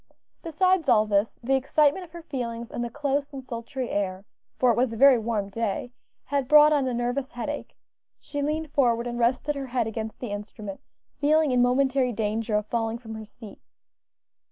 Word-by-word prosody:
Besides 350 -1 +1
all 215 -1 +5
this, 205 +1 0
the 265 +3 +1
excitement 290 +6 +2
of 335 - -21
her 340 -1 -9
feelings, 235 -5 -5
and 240 - -3
the 240 - -3
close 285 +2 -2
and 270 -2 -7
sultry 250 +1 -5
air 195 -1 -2 0.3
for 250 -1 +4
it - - +1
was 245 +1 +1
a 225 - -6
very 270 -1 +7
warm 215 -3 -2
day 230 +3 -3 0.3
had 280 -1 -1
brought 300 +1 +7
on 280 -3 +2
a 255 - -1
nervous 245 +3 -2
headache. 265 +5 -5 0.4
She 290 - -5
leaned 305 +1 -2
forward 240 -5 +2
and 240 0 -4
rested 250 +5 +1
her 275 -2 -5
head 245 -2 0
against 220 0 -5
the 245 -5 -5
instrument, 205 -1 -7 0.4
feeling 305 0 +3
in 250 -1 +3
momentary 255 0 +2
danger 215 +1 -1
of 210 0 +1
falling 225 0 -2
from 225 -2 -9
her 220 0 -7
seat. 215 0 -13
245 Hz, 190 wpm, -26 LUFS, 225-280 Hz, 0.4 s, very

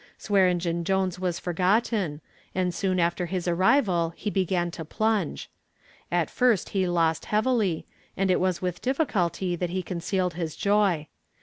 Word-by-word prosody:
Swearengen 180 -4 +1
Jones 190 0 0
was 180 -2 -1
forgotten, 185 -2 0 0.3
and 180 -1 0
soon 185 +1 0
after 175 +1 +1
his 180 0 -3
arrival 175 -2 +2
he 210 - -3
began 180 -3 0
to 170 - -6
plunge. 215 +6 -1 0.6
At - - +1
first 245 -7 +2
he 190 -2 0
lost 165 -2 +1
heavily, 215 -6 +1 0.3
and 195 -1 +2
it 180 - +3
was 185 -1 0
with 180 -1 -2
difficulty 190 - 0
that 175 0 -2
he 185 +1 -2
concealed 180 +1 -1
his 160 -2 -4
joy. 200 -7 +2
185 Hz, 145 wpm, -26 LUFS, 170-195 Hz, 0.6 s, it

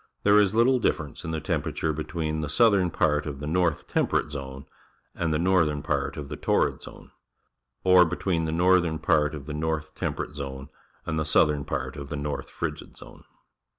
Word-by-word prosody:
There 105 +1 +6
is 105 0 +2
little 125 +3 +4
difference 75 - -2
in 80 -1 -3
temperature 80 +2 -1
between 80 0 -3
the 75 - -3
southern 100 0 +4
part 75 -2 +1
of 70 -2 -5
the 75 - -5
North 85 0 0
Temperate 75 - 0
Zone 70 -1 -7 0.5
and 80 -2 -2
the 75 - +1
northern 80 -4 +2
part - - -2
of 75 -2 -5
the - - -6
Torrid - - +1
Zone, - - -13 0.7
or 90 -1 +7
between 85 0 -1
the 80 - -2
northern 85 -1 +3
part 80 -2 +1
of 70 -3 -8
the 75 - -6
North 80 0 -2
Temperate - - -4
Zone 70 -1 -7 0.4
and 80 - -2
the - - +1
southern 75 -2 +2
part 70 -3 -4
of 70 -1 -7
the - - -4
North 70 -2 -4
Frigid - - -6
Zone. - - -14
80 Hz, 185 wpm, -26 LUFS, 75-85 Hz, 0.7 s, or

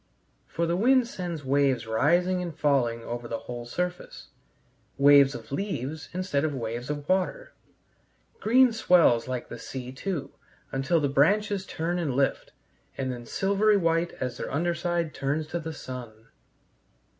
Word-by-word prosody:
For 170 - -1
the 170 +1 0
wind 250 +5 +4
sends 175 - -5
waves 135 -3 +2
rising 175 +11 +2
and 170 -3 -6
falling 125 -7 +1
over 120 0 -5
the 115 - -3
whole 120 0 -7
surface, 180 +7 -4 0.7
waves 140 -1 +6
of 120 +1 -10
leaves 155 - -4
instead 180 -6 -1
of 155 -3 -1
waves 120 +1 -4
of 145 -1 -4
water, 190 - -1 0.9
green 250 +2 +5
swells 170 - +4
like 130 -1 -4
the - - -8
sea, 130 -1 -7
too, 150 +2 -4 0.4
until 140 +6 +1
the 145 - +1
branches 195 +8 +2
turn 175 +2 -2
and 145 -7 -1
lift, 135 0 0 0.5
and 130 -1 -2
then 120 -1 -8
silvery 200 - +2
white 165 -1 +1
as 125 -2 -4
their - - -5
under 170 +5 0
side 170 -1 -2
turns 145 +3 -1
to 170 - -2
the 160 0 -5
sun. 125 -5 -7
150 Hz, 155 wpm, -27 LUFS, 130-180 Hz, 0.9 s, waves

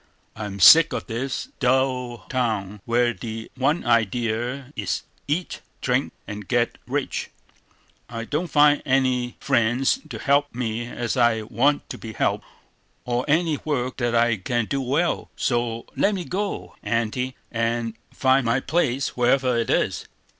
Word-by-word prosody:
I'm 105 -2 -6
sick 165 - +8
of - - -3
this 125 +2 -3
dull 125 -4 0
town, 105 -6 -2
where 120 +1 +2
the 115 -1 -7
one 140 +6 +1
idea 120 +4 0
is 100 -5 -2 0.2
eat, 165 +5 -2 0.2
drink, 130 +2 0
and 105 -1 -7
get 120 -1 0
rich; - - -2 0.8
I 115 -1 -5
don't 155 +8 -2
find 150 -2 +4
any 130 -3 +1
friends 120 - +2
to - - -5
help 145 -1 +1
me 120 -1 -2
as 120 -1 -3
I 120 -2 +3
want 135 +7 +1
to - - -7
be 110 -1 -7
helped, - - 0 0.6
or 125 +1 -1
any 155 +1 +2
work 130 -4 -2
that 120 -2 0
I 115 -1 +3
can 120 +4 -1
do 135 +5 -2
well; 145 +7 0
so 120 -1 -1
let 205 0 +2
me 180 -3 -4
go, 200 +2 -3
Aunty, 120 +3 -1 0.2
and 115 0 -1 0.2
find 130 0 +3
my 115 +2 +2
place, 140 -3 0
wherever 125 +1 +2
it 115 -1 0
is." - - 0
125 Hz, 145 wpm, -24 LUFS, 115-135 Hz, 0.8 s, sick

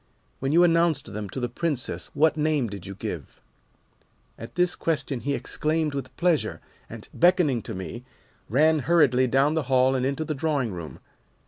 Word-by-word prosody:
When 135 +1 -1
you 170 +3 +5
announced 165 - +2
them 105 -1 -5
to 130 - -5
the 125 - -1
Princess 145 +1 -3
what 160 +2 +3
name 150 -5 0
did 100 -2 -8
you 100 - -7
give?' 90 - -7 1.0
"At 115 - -10
this 180 0 +2
question 150 -5 -2
he 140 +3 -1
exclaimed 155 +1 -1
with 135 -2 -6
pleasure, 170 -3 +1 0.3
and, - - -9
beckoning 170 -8 +3
to - - -7
me, 95 +6 -7 0.5
ran 155 +6 +4
hurriedly 140 -4 +3
down 135 +4 +3
the 160 - +1
hall 130 0 +4
and 130 -1 0
into 140 +4 -1
the 155 - -2
drawing 140 -6 -1
room. 85 -3 -8
140 Hz, 175 wpm, -25 LUFS, 120-160 Hz, 1.0 s, you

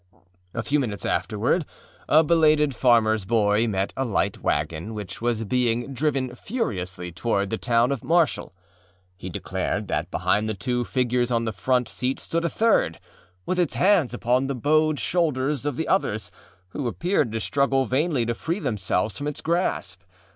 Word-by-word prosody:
A 115 - -2
few 145 +7 +1
minutes 110 -7 -2
afterward 115 - 0 0.5
a 155 +2 +6
belated 155 -2 +4
farmerâs 110 -4 +3
boy 105 0 +2
met 95 -2 -1
a 135 - -1
light 115 -6 0
wagon 80 +8 -2
which 105 -1 -7
was 115 -1 0
being 120 +3 0
driven 135 -2 -1
furiously 95 - -4
toward 100 +2 -1
the 110 - -2
town 120 +2 +2
of 135 -5 -3
Marshall. 170 -1 +1 0.6
He 95 0 -7
declared 85 - -3
that - - -1
behind 105 +1 0
the 110 - -2
two 120 +5 -1
figures 125 -1 +1
on 115 -1 0
the 110 - -2
front 125 +4 +1
seat 125 +4 -2
stood 170 0 -2
a 170 - +1
third, 215 - +2 0.5
with 180 - -1
its 175 -4 +1
hands 185 -8 +3
upon 125 +2 +1
the 140 - -2
bowed 155 +4 +2
shoulders 145 -5 0
of 145 - -1
the 160 - -2
others, 110 - 0 0.4
who 130 +7 -4
appeared 150 - 0
to 115 - -1
struggle 135 +2 +1
vainly 130 +1 +1
to 120 - 0
free 165 +9 -3
themselves 105 - -1
from 145 - -4
its 150 - -4
grasp. 160 - -1
125 Hz, 170 wpm, -24 LUFS, 110-150 Hz, 0.6 s, a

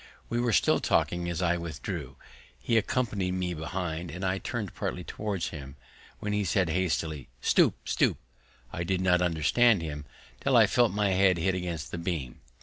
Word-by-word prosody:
We 120 - 0
were 120 -1 +1
still 100 - +3
talking 85 0 +1
as 85 +1 -2
I 85 0 +2
withdrew, 85 -4 -5 0.4
he 115 - -1
accompanying 105 -5 0
me 90 -1 -1
behind, 85 +1 -4
and 90 +3 -5
I 95 +1 0
turning 110 -3 -3
partly - - -3
towards 105 -4 -3
him, 70 -4 -9 0.4
when 105 0 -3
he 105 0 +1
said 90 -1 +1
hastily, 80 -5 -1
"Stoop, - - +4
stoop!" - - +2 0.6
I 85 - -2
did 95 +1 0
not 90 -1 +3
understand 90 +5 +3
him, 75 -2 -5 0.3
till 135 -3 +3
I 115 - +8
felt 120 +2 +3
my 100 0 +1
head 95 -1 +4
hit 95 +3 +1
against 85 -6 -4
the 85 - -4
beam. 80 -8 -4
90 Hz, 175 wpm, -28 LUFS, 85-100 Hz, 0.6 s, I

